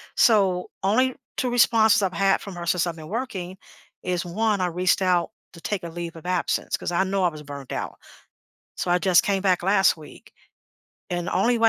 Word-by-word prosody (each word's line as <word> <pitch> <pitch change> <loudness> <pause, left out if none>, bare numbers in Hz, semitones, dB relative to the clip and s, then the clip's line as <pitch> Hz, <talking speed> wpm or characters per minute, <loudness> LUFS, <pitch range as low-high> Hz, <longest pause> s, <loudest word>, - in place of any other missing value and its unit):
so 195 -6 +3
only 255 +6 +2 0.2
2 250 - 0
responses 225 -3 +4
I've 190 -1 0
had 195 -1 +2
from 195 -3 -8
her 175 0 -6
since 180 0 +1
I've 165 - -3
been 155 -1 -10
working 195 -6 -4 0.5
is, 180 -1 -2
1, 205 +2 0
I 180 - +1
reached 180 +2 +1
out 180 -2 +2 0.2
to 170 - -13
take 200 -4 -3
a 170 - -5
leave 170 0 -6
of 165 - -12
absence, 180 -1 -1
'cause - - -4
I 175 +2 +2
know 195 0 -1
I 175 - +4
was 155 -2 -10
burned 140 -2 -8
out. - - -4 0.8
So 175 - -3
I 175 - +4
just 180 -2 +4
came 195 -1 0
back 185 -3 +2
last 195 -1 +4
week, 155 - -14 0.8
and 175 0 -2
the - - -3
only 235 +6 +2
way 225 0 +5
185 Hz, 210 wpm, -24 LUFS, 175-200 Hz, 0.8 s, way